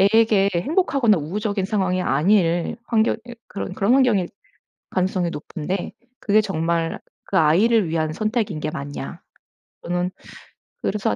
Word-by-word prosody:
애에게 200 0 +4
행복하거나 270 - +2
우호적인 200 +5 -2
상황이 190 -2 0
아닐 170 +3 +2
환경 225 -1 +2
이 240 - -8
그런 195 - -5
그런 205 +6 +3
환경일 230 -10 +3 0.6
가능성이 185 -1 0
높은데 170 +3 -4 0.3
그게 215 +1 +3
정말 165 -4 -1 0.2
그 190 - -1
아이를 190 +6 +4
위한 160 -1 -1
선택인 215 -3 -1
게 155 0 -3
맞냐 145 -2 -6 0.6
저는 180 +1 -1 0.7
그래서 200 - 0
190 Hz, 295 characters per minute, -22 LUFS, 170-215 Hz, 0.7 s, 애에게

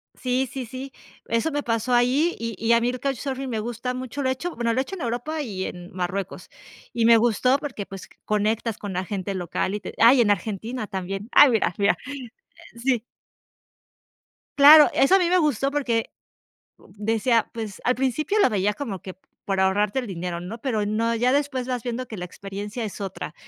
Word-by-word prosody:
Sí, 255 0 -1
sí, 265 -2 -5
sí. 260 +4 -8 0.4
Eso 230 +8 0
me 290 0 -2
pasó 230 +1 -1
ahí, 260 +8 +3
y 230 -1 -4
y 225 +3 +2
a 235 - +4
mí 240 - +1
el 255 0 -4
Couchsurfing 270 0 -3
me 225 -3 -2
gusta 240 +3 -4
mucho, 255 +2 -5
lo 260 - +1
he - - +2
hecho, 340 +7 -5
bueno, 235 -1 0
lo 255 - 0
he - - +4
hecho 330 +8 -6
en 360 - -8
Europa 245 +6 -3
y 195 -9 -4
en 175 0 -8
Marruecos. 185 +1 -4 0.4
Y 230 -1 +1
me 230 0 +7
gustó 240 +3 +3
porque, 255 -9 -5
pues, 195 -1 -10 0.2
conectas 215 +1 0
con 205 -2 -6
la 185 +1 -2
gente 195 0 -4
local 185 +2 -2
y - - -3
te - - -8
ah 230 +3 +8
y 265 - +4
en 210 -3 +3
Argentina 215 +4 -3
también. 195 +3 -5
Ay, 290 - +8
mira, 220 -6 +1
mira. 200 +1 +3 0.8
Sí. 240 0 0 1.6
Claro, 295 +2 +9
eso 275 +8 +5
a - - +5
mí 350 -2 +2
me 365 - +4
gustó 280 -4 +1
porque 245 -6 -1 0.7
decía, 225 +2 0
pues, 220 -4 -6
al 250 - +2
principio 285 - 0
lo 405 - +5
veía 205 -1 +1
como 215 -7 -5
que 185 - -9 0.3
por 195 -1 -1
ahorrarte 200 +5 +2
el 250 - -5
dinero, 175 -2 -4
¿no? 190 +6 -6
Pero 220 -5 -1
no, 225 +3 0
ya 245 +2 +2
después 275 -3 0
vas 250 -2 -2
viendo 245 +2 -4
que 220 - -8
la 180 - -4
experiencia 200 +5 -6
es 215 -1 -6
otra. 195 -5 -5
230 Hz, 205 wpm, -24 LUFS, 205-260 Hz, 1.6 s, Claro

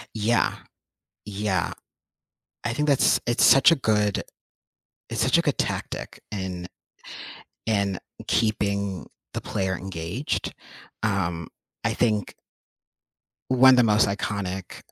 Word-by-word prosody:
Yeah. 110 +2 +2 0.7
Yeah. 100 -4 -1 0.9
I 120 - 0
think 150 +4 -1
that's 140 - +4
It's 120 - +3
such 135 +5 +8
a 165 - +4
good 105 -5 +1 0.9
it's - - -1
such - - +4
a - - +3
good - - 0
tactic - - -3
in 95 -3 -4 1.0
in 100 -4 +1 0.3
keeping 100 -3 0 0.3
the - - -3
player 95 -1 -2
engaged, 95 - -4 0.5
um, 85 -6 -1 0.4
I - - +1
think 105 -4 +1 1.2
one 130 +1 +7
of 130 - +6
the 125 - +6
most 105 -2 +4
iconic, 100 -2 -3
105 Hz, 115 wpm, -25 LUFS, 95-115 Hz, 1.2 s, such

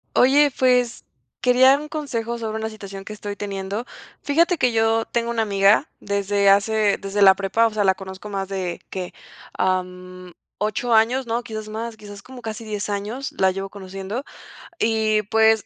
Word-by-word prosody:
Oye, 285 +3 +5
pues, 250 -2 +2 0.3
quería 260 +2 +5
un 300 - -7
consejo 235 -7 -3
sobre 220 -1 -3
una 220 0 -3
situación 195 -2 -9
que 215 - -7
estoy 205 -1 -6
teniendo. 200 +3 -4 0.4
Fíjate 335 +5 +2
que 250 -5 +2
yo 225 0 +2
tengo 235 0 -2
una 230 -1 0
amiga 200 +6 +3
desde 200 0 +1
hace 205 +1 +3
desde 200 +1 -3
la 190 -1 +8
prepa, 200 +4 +2
o - - -2
sea, 210 -1 +1
la 190 - +4
conozco 190 +1 -9
más 195 -1 -3
de, 185 -3 -4
¿qué?, 185 -2 -5 0.4
am, 185 -1 -3 0.2
8 215 +3 -1
años, 240 +4 +3
¿no? 230 +1 -1
Quizás 215 -1 -7
más, 225 +1 -5
quizás 205 -2 -11
como 255 -1 -11
casi 225 0 -6
10 210 -1 -4
años 210 +7 -4
la 190 -1 +3
llevo 195 +1 -5
conociendo. 195 +4 -6 0.6
Y, 220 -1 +2
pues, 220 +1 +3
215 Hz, 175 wpm, -22 LUFS, 195-235 Hz, 0.6 s, la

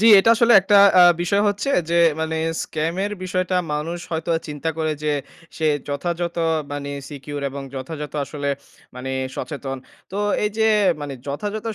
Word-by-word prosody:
জ্বি, 225 - +6
এটা 225 +4 +5
আসলে 235 0 +5
একটা 200 +1 +3 0.2
আ - - +10 0.2
বিষয় 200 +4 +2
হচ্ছে 205 +7 -2 0.2
যে 170 - +2 0.2
মানে 160 0 -1 0.3
স্ক্যামের 170 +6 -2
বিষয়টা 185 0 -1 0.2
মানুষ 165 +4 -3
হয়তোবা 165 0 0
চিন্তা 150 +2 -3
করে 155 -1 0
যে, 150 -1 +1 0.4
সে 160 - 0 0.2
যথাযথ 170 +4 -2 0.4
মানে 140 0 -4 0.2
secure 145 0 -7
এবং 140 +1 -6
যথাযথ 145 +2 -6
আসলে 145 0 -4 0.5
মানে 130 +1 -5 0.3
সচেতন। 135 -3 -5 0.4
তো 200 - -3 0.3
এইযে 220 +1 +1 0.3
মানে 145 -2 -5
যথাযথ 205 +10 -4
160 Hz, 150 wpm, -22 LUFS, 145-190 Hz, 0.5 s, আ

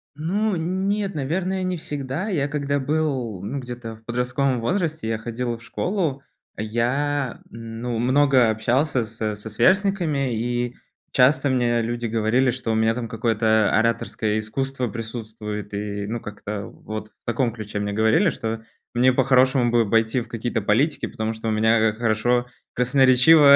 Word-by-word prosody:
Ну, 195 +7 0
нет, 190 +3 -1
наверное, 185 +7 -1
не 185 -1 -1
всегда. 145 +5 -3
Я, 150 -9 0
когда 140 -1 -1
был, 135 - -1
ну, 130 +8 -4
где-то, 120 -2 -7
в 110 0 -21
подростковом 125 +2 0
возрасте, 160 - -1
я 110 0 0
ходил 120 +1 -3
в 115 - -16
школу, 160 - -2 0.4
я 125 +5 -1
ну 115 +1 -5
много 130 0 +4
общался 120 +4 +1
со 110 -1 -3
со 105 +2 -8
сверстниками, 170 - +2
и 120 +1 -2 0.4
часто 135 +2 +4
мне 120 -2 +2
люди 120 +1 -2
говорили, 115 +4 +2
что 120 -2 -3
у - - +1
меня 110 0 +3
там 120 -1 -4
какое-то 110 -1 +2
ораторское 110 -1 +1
искусство 130 +3 -2
присутствует, 110 -2 -6
и, 100 0 -3
ну, 115 +2 -3
как-то 105 -1 -6
вот 110 0 -7
в - - -43
таком 120 0 0
ключе 105 -2 -5
мне 105 0 -2
говорили, 110 - +3
что 115 -5 -4 0.3
мне 125 +2 +4
по-хорошему 130 -1 +3
бы 115 -3 +2
пойти 115 +3 +2
в 120 - -6
какие-то 115 0 -2
политики, 135 +10 +1
потому 110 0 -3
что 110 0 -6
у - - +1
меня, 110 +1 +3
а, 105 - -3
хорошо, 120 +2 +1 0.3
красноречиво 135 +3 +6
120 Hz, 155 wpm, -23 LUFS, 110-140 Hz, 0.4 s, красноречиво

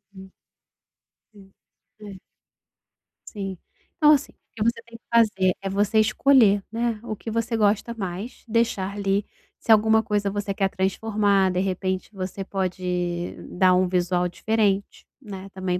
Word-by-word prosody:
Hum. 190 0 -12 1.0
Sim, 195 -2 -18 0.5
é. 200 -3 -10 1.1
Sim. 195 -3 -5 0.4
Então 300 -1 +6
assim, 290 -3 +2
o - - -35 0.2
que 215 - -1
você 230 +1 0
tem 230 0 -11
que - - -41
fazer 195 -5 +3
é 195 - -3
você 205 +3 +1
escolher, 215 -2 +4
né, 230 -1 -1
o 220 - -4
que 225 - -8
você 230 +1 -1
gosta 215 +2 +1
mais, 195 +1 -6
deixar 205 -3 0
li. 200 0 +1 0.4
Se - - 0
alguma 220 0 +5
coisa 205 -2 -1
você 205 0 -3
quer 195 0 0
transformar, 195 0 +1
de 180 - -1
repente, 185 0 -2
você 195 0 -5
pode 180 -2 -3 0.2
dar 185 0 +4
um 185 0 +2
visual 180 0 0
diferente, 205 +1 -1 0.2
né, 195 -5 -8
também 185 -1 -2
200 Hz, 150 wpm, -24 LUFS, 185-220 Hz, 1.1 s, Então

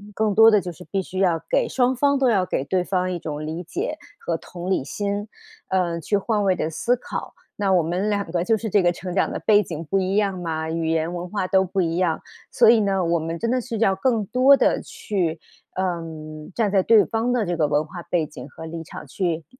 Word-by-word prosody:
更 215 -2 +1
多 225 +2 +8
的 210 -2 +5
就 175 0 -5
是 180 +2 -12
必 195 -1 +1
须 185 0 -6
要 170 -4 +2
给 - - +2
双 255 0 +1
方 280 +2 +2
都 265 -2 +3
要 190 -5 +2
给 135 - -2
对 180 +4 0
方 185 -1 -1
一 175 - -4
种 155 -2 -5
理 160 +3 -4
解 300 - -4 0.2
和 165 -1 -2
同 180 +3 -7
理 160 - +1
心， 205 +5 -3 0.4
呃， 175 -3 0
去 205 +6 +1
换 210 0 0
位 190 -2 +3
地 155 - -2
思 240 +10 +1
考。 - - -6 0.2
那 200 -2 0
我 175 - +4
们 180 +6 -1
两 200 -1 0
个 175 -1 0
就 220 +4 +2
是 220 -2 -5
这 205 - +4
个 175 -1 +3
成 180 +1 -6
长 190 - +1
的 - - -3
背 210 -1 +4
景 165 -4 -6
不 195 +6 +1
一 190 +1 -1
样 200 -3 +1
嘛， 160 -2 -3
语 165 -1 -1
言、 160 +1 0
文 175 0 -5
化 195 -2 -2
都 190 0 +3
不 190 +1 -3
一 170 -1 0
样， 175 -3 +1 0.3
所 235 -2 +6
以 230 - +5
呢， 195 -3 +1
我 170 0 +1
们 165 +1 -4
真 230 +4 -1
的 255 0 +1
是 230 -1 -5
要 195 -3 +3
更 225 +1 +1
多 255 +6 +5
地 - - +2
去 170 -6 -3 0.4
呃， 180 -2 -1 0.5
站 215 -4 +1
在 195 -2 +4
对 220 +1 +5
方 230 +2 -1
的 245 -4 +1
这 175 -1 -1
个 155 -2 +2
文 150 +1 +1
化 175 +2 -8
背 170 -3 0
景 150 - -10
和 160 - -10
立 165 0 -6
场 - - -10
去 170 -4 -2
185 Hz, 265 characters per minute, -23 LUFS, 170-210 Hz, 0.5 s, 多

